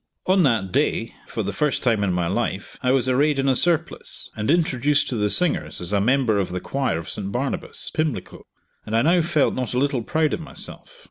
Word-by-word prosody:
On 185 +1 +4
that 115 - +1
day, - - 0
for - - -3
the - - -3
first 150 -3 0
time 115 -5 +2
in 95 - +1
my 90 -1 0
life, - - -2
I 125 - 0
was 130 -1 +2
arrayed 140 +3 +2
in 135 0 0
a 135 - +4
surplice, 170 +3 +1
and 105 0 -3
introduced 145 -3 +2
to 125 - -2
the 105 -2 0
singers 180 - +1
as 90 +3 -1
a 100 - +2
member 120 -2 +2
of 95 - -1
the 90 +1 -3
choir 135 -4 -1
of 85 - -7
St. 100 -1 -2
Barnabas, 130 +5 -4
Pimlico; 155 -4 -3 0.4
and 110 +1 -1
I 115 - +3
now 170 +3 +4
felt 155 -3 +1
not 125 -1 -3
a - - +1
little 135 -1 +1
proud 155 +6 0
of - - -2
myself. - - -8
130 Hz, 220 wpm, -23 LUFS, 105-150 Hz, 0.4 s, On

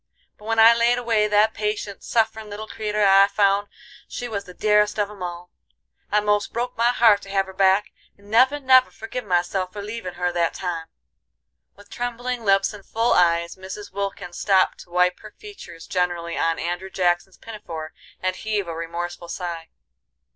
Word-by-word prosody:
But 210 - -17
when 225 0 -1
I 225 +1 +8
laid 235 +1 +2
away 225 -3 +1
that 210 +1 +3
patient, 210 -1 -4
sufferin' 220 -1 0
little 210 +1 -7
creeter 210 -1 -1
I 195 0 +7
found 200 0 +2 0.4
she 245 - -5
was 200 -4 -4
the 180 - -12
dearest 210 0 +2
of 205 -1 0
'em 205 -3 -13
all. 175 0 -6 0.6
I 210 0 +3
most 205 0 0
broke 245 +2 -3
my 235 +1 +3
heart 225 -4 +4
to 195 - -12
hev 195 -1 +1
her 190 - -11
back, 195 +1 +3 0.3
and 200 +1 -17
never, 260 +6 +4
never 260 -2 +5
forgive 225 +3 -7
myself 180 0 0
for 205 +1 -7
leavin' 210 -4 -6
her 180 0 -1
that 170 -1 0
time." 170 -3 -4 0.9
With 205 0 -18
trembling 245 0 -4
lips 195 -1 +3
and 205 -1 -11
full 230 +4 +1
eyes 170 -1 +2
Mrs. 190 +2 -8
Wilkins 195 -3 -5
stopped 190 -2 +2
to - - -13
wipe 180 +1 +2
her 215 -1 -13
features 400 - -11
generally 175 -2 -2
on 165 0 0
Andrew 175 +2 -4
Jackson's 180 0 0
pinafore, 165 -8 -8 0.3
and 185 0 0
heave 210 -3 -2
a 165 - -4
remorseful 170 +1 -5
sigh. 170 -2 -5
200 Hz, 180 wpm, -23 LUFS, 180-220 Hz, 0.9 s, I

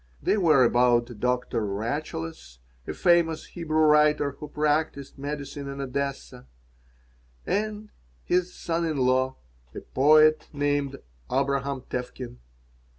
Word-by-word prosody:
They - - +1
were 160 -9 +4
about 120 -1 +2
Doctor 125 -2 0
Rachaeles, 100 - -4 0.3
a - - -3
famous 170 -2 +2
Hebrew 155 -2 -2
writer 150 -1 +4
who 150 +2 -9
practised 150 -2 -1
medicine 140 0 -5
in 140 0 -7
Odessa, 135 - -4 1.0
and 210 +1 -2 0.3
his 180 0 0
son 170 0 -2
in 160 -3 -1
law, 130 0 +2 0.4
a - - -6
poet 155 +3 +4
named 145 -1 -1 0.3
Abraham 140 0 0
Tevkin. 125 -1 -6
140 Hz, 110 wpm, -26 LUFS, 125-155 Hz, 1.0 s, were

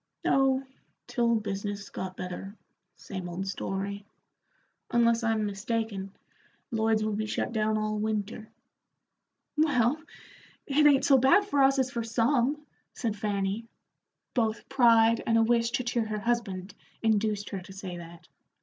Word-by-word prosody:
"Oh, 270 0 +3 0.4
till 235 -2 +1
business 205 -1 -4
got 185 0 -5
better 185 +2 -6 0.4
same 185 -3 -7
old 180 +3 -4
story. 195 +1 -3 0.9
Unless 235 0 +3
I'm 225 -2 +1
mistaken, 205 -1 -3 0.6
Lloyd's 220 -1 +2
will 215 0 -1
be 215 +1 -2
shut 215 - -2
down 215 -1 +1
all 215 0 -1
winter." 215 0 -3 1.1
"Well, 295 -2 +2 0.6
it 295 +2 +4
ain't 280 -2 +4
so 270 -2 +6
bad 275 +11 +5
for 290 -9 +1
us 270 0 +5
as 260 -1 +1
for 235 -1 -2
some," 245 +5 +1 0.3
said 225 -4 -2
Fanny. 205 +1 -2 0.7
Both 225 -3 0
pride 230 -3 +5
and 230 - +4
a 225 - +5
wish 230 0 +2
to 250 - -1
cheer 235 -2 -1
her 215 -1 -3
husband 205 -5 -2 0.3
induced 215 -2 +1
her 195 - -4
to 185 - -12
say 190 -2 -7
that. 170 0 -11
220 Hz, 140 wpm, -28 LUFS, 200-240 Hz, 1.1 s, so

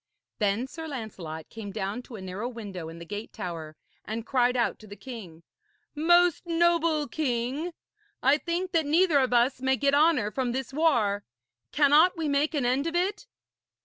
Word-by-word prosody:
Then 210 +3 +1
Sir 320 +4 -8
Lancelot 190 - -6
came 220 -2 -7
down 195 +4 -3
to 245 - -11
a 205 - -8
narrow 190 +6 -4
window 200 -9 -7
in 165 - -10
the 170 - -9
gate 205 +5 -6
tower, 165 -6 -6 0.3
and 225 +1 -5
cried 250 0 +2
out 235 - 0
to 215 - -14
the 205 - -9
king: 195 -7 -10 0.5
'Most 345 +2 +3
noble 335 -3 +2
king, 275 +3 -2 0.5
I 275 +3 +5
think 350 +3 -2
that 320 -3 +1
neither 325 -1 +4
of 260 -2 +1
us 245 +2 +2
may 265 0 +2
get 280 +1 +2
honour 290 -8 +3
from 250 -1 -1
this 265 +1 -4
war. 230 -10 +2 0.5
Cannot 300 +5 +5
we 320 -2 -1
make 290 +3 +1
an 275 -4 0
end 260 +5 +1
of 330 - -3
it?' 405 +7 -1
260 Hz, 180 wpm, -27 LUFS, 210-315 Hz, 0.5 s, I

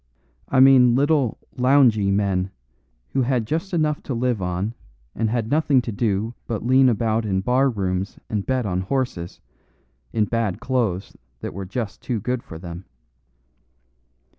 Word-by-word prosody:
I 135 - +3
mean 130 -3 +7
little, 140 -3 +2 0.2
loungy 125 -6 +4
men, 100 -2 +1 0.6
who 135 - 0
had 125 -2 +1
just 165 - -2
enough 155 -4 0
to 130 - -4
live 120 -3 0
on 90 +5 -2 0.4
and 110 -1 -1
had 115 -1 -1
nothing 150 -3 +3
to 115 - -4
do 110 +1 -1
but 115 -1 -3
lean 130 +1 +5
about 115 0 +1
in 95 -3 0
bar 130 +6 +2
rooms 95 -3 -2
and 105 -2 -2
bet 130 0 -1
on 90 -2 -1
horses, 95 -6 -3 0.7
in 110 -2 +1
bad 115 -3 -1
clothes 115 -8 -1 0.3
that - - -5
were 95 0 -6
just 110 +1 -4
too 120 -3 -2
good 125 +4 -2
for 80 - -10
them. 85 +2 -8
115 Hz, 155 wpm, -23 LUFS, 100-130 Hz, 0.7 s, mean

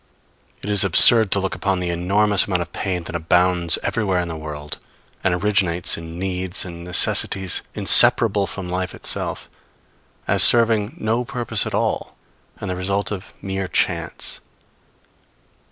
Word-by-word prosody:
It - - -5
is 100 -1 +4
absurd 110 +4 +8
to 100 - 0
look 95 0 -4
upon 95 +1 -3
the 90 -1 -4
enormous 100 +4 +1
amount 90 -3 -2
of 85 - -18
pain 90 -3 -4
that 80 - -10
abounds 90 +1 +1
everywhere 95 -5 -2
in 90 -1 -4
the 80 - -6
world, 75 0 -9 0.4
and 90 - 0
originates 90 -3 -1
in 80 0 -10
needs 95 0 -4
and 85 -1 -10
necessities 90 +1 0
inseparable 100 -4 +4
from 100 -3 -8
life 90 0 -5
itself, - - -3 0.8
as - - +2
serving 115 +1 +4
no 115 0 -2
purpose 120 -1 -3
at - - -5
all - - -3 0.4
and 105 - -7
the 90 - -4
result 100 +3 -3
of 95 -2 -9
mere 95 0 -5
chance. 90 - -4
95 Hz, 150 wpm, -19 LUFS, 90-100 Hz, 0.8 s, absurd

